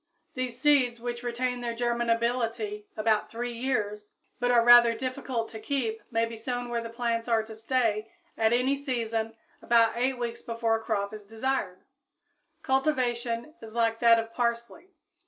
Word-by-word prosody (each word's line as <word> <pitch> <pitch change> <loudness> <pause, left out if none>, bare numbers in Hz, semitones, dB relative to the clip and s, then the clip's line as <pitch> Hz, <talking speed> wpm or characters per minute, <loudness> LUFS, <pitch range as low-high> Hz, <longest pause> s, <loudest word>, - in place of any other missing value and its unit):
These 255 -2 -4
seeds, 255 -4 +3
which 240 0 -4
retain 245 +1 -2
their 235 -1 -3
germinability 235 -2 -1
about 215 0 +1
three 240 +1 -4
years, 210 -4 -2 0.3
but 245 - +1
are 240 -1 +5
rather 240 -1 +8
difficult 255 -2 -3
to 220 - -8
keep, 225 -2 -2
may 230 0 +1
be 230 0 -7
sown 245 +2 -4
where 235 -1 -1
the 230 - -6
plants 230 0 -2
are 225 -2 +2
to 220 0 -10
stay, 225 -2 0 0.2
at 220 0 +2
any 250 +3 +2
season, 230 -5 -2 0.3
about 230 -1 +4
eight 255 +2 0
weeks 235 -1 -4
before 230 -1 -1
a 225 - -3
crop 210 -2 -2
is 215 -1 -8
desired; 220 -3 -3 0.8
cultivation 255 -2 0
is 225 0 -10
like 230 -1 +1
that 230 -1 +6
of 225 0 -3
parsley. 235 +9 -2
235 Hz, 160 wpm, -28 LUFS, 225-245 Hz, 0.8 s, rather